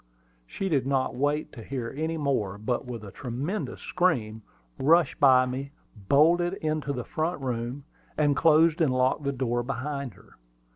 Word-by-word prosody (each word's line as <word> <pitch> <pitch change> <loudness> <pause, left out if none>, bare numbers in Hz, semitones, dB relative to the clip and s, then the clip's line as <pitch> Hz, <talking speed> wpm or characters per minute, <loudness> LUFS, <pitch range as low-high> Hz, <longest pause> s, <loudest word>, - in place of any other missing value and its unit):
She 195 - -4
did 140 -7 +1
not 135 -1 0
wait 145 +4 -1
to 115 - -10
hear 125 -1 -5
any 160 +2 -2
more, 130 -10 -1
but, 120 +5 -2
with 120 -3 -6
a 100 - -9
tremendous 140 - -4
scream, 115 -12 0 0.4
rushed 165 +5 +3
by 130 -2 +6
me, 135 +3 -5 0.4
bolted 175 +5 +4
into 155 -4 -2
the 125 -3 -3
front 160 +5 -2
room, 125 +1 -4 0.3
and 145 -2 +3
closed 160 +1 +4
and 150 -5 +3
locked 130 +3 +1
the 140 - +1
door 120 -2 -1
behind 135 -1 -4
her. - - -20
140 Hz, 160 wpm, -27 LUFS, 125-155 Hz, 0.4 s, by